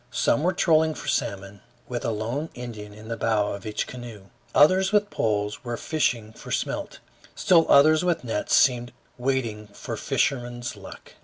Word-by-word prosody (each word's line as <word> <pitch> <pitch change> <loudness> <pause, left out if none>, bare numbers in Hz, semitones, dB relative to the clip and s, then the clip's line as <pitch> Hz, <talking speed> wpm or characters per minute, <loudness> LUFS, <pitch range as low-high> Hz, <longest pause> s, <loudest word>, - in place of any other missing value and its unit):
Some 125 +4 +1
were 180 +3 +2
trolling 160 -3 +3
for - - -9
salmon, 100 0 -2 0.3
with 120 -1 -4
a - - 0
lone 115 +8 -3
Indian 110 -4 -8
in 105 +1 -12
the 115 - -3
bow 110 -3 0
of 100 +1 -7
each 105 - -2
canoe; 115 -6 -10 0.3
others 185 +6 +5
with 205 -1 +2
poles 105 +2 -1
were 120 -2 -4
fishing 120 -9 -1
for - - -12
smelt; - - -3 0.4
still 170 -3 +4
others 155 +4 +6
with 175 -5 0
nets 115 -4 0
seemed 120 -2 +3 0.3
waiting 120 -5 -1
for 100 - -7
fisherman's 120 -3 -1
luck. - - -12
120 Hz, 165 wpm, -25 LUFS, 105-150 Hz, 0.4 s, others